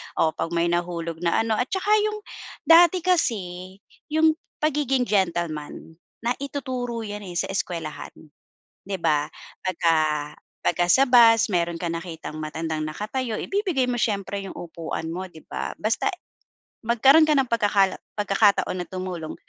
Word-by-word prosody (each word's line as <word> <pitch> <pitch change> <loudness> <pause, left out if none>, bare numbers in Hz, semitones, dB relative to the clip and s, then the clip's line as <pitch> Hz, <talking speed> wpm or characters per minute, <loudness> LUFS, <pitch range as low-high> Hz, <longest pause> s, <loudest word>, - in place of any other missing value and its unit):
Oh, 160 - +2
'pag 165 +1 -4
may 170 0 +1
nahulog 170 -1 -2
na 175 +5 +1
ano, 220 -1 0
at 250 - 0
tsaka 380 +5 -1
yung 425 0 -2 0.4
dati 340 +1 +6
kasi 190 - -1 0.3
yung 315 +1 +4 0.3
pagiging 275 -4 +1
gentleman, 170 -5 -2 0.2
naituturo 250 -2 -3
yan 205 -1 -6
eh, 175 - -8
sa 190 +3 -1
eskuwelahan, 170 -5 -4 0.7
di 200 - -2
ba? 155 -4 +1 0.3
Pagka 170 -2 +1 0.7
pagka 175 0 +1
sa 270 - +6
bus 230 -3 +6
meron 170 -2 0
kang 170 -1 -2
nakitang 165 -3 -8
matandang 155 0 -3
nakatayo, 220 +8 -3
ibibigay 370 - -1
mo 245 - 0
siyempre 200 -2 -1
yung - - -9
upuan 165 -1 -5
mo, 185 +2 -5
di 160 -3 -15
ba? - - -5
Basta 220 +1 0
eh, 360 - -10 0.6
magkaroon 265 +7 +5
ka 305 - +3
ng 265 - +1
pagkakala 205 -4 +3 0.2
pagkakataon 200 -3 +2
na - - -16
tumulong, 185 -4 -5
195 Hz, 145 wpm, -24 LUFS, 170-250 Hz, 0.7 s, dati